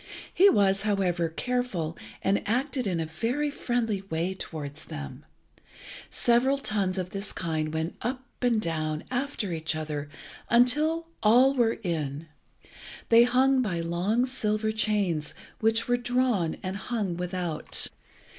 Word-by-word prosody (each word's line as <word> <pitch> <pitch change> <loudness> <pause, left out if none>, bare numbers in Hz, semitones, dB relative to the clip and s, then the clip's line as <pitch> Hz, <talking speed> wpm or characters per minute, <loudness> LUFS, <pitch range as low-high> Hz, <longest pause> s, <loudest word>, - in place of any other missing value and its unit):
He 395 +3 +7
was, 195 - +3
however, 185 -5 +1
careful, 185 -5 -2 0.3
and 195 +1 +2
acted 255 +1 0
in 175 -3 0
a 165 - -1
very 235 - -1
friendly 230 -7 -1
way 165 +4 -1
towards 155 -5 -6
them. 70 -2 -8 0.8
Several 250 +3 +3
tuns 200 -8 0
of 180 0 -3
this 200 +1 -4
kind 155 -3 -2
went 160 +2 -3
up 255 +2 -3 0.2
and 245 -3 +3
down 155 -4 -2
after 250 -6 -2
each 160 -1 -1
other, 150 -2 -4 0.4
until 300 +8 +3 0.2
all 250 +5 +6
were 235 -4 +2
in. 155 -4 -2 0.8
They 235 +1 +8
hung 260 +2 +3
by 185 -8 -1
long 180 +9 +1
silver 215 -4 0
chains, 205 -8 0 0.2
which 225 +1 +2
were 245 0 +3
drawn 245 -8 +1
and 190 +1 -3
hung 200 -4 -2
without. 180 -2 -1
205 Hz, 135 wpm, -27 LUFS, 165-245 Hz, 0.8 s, They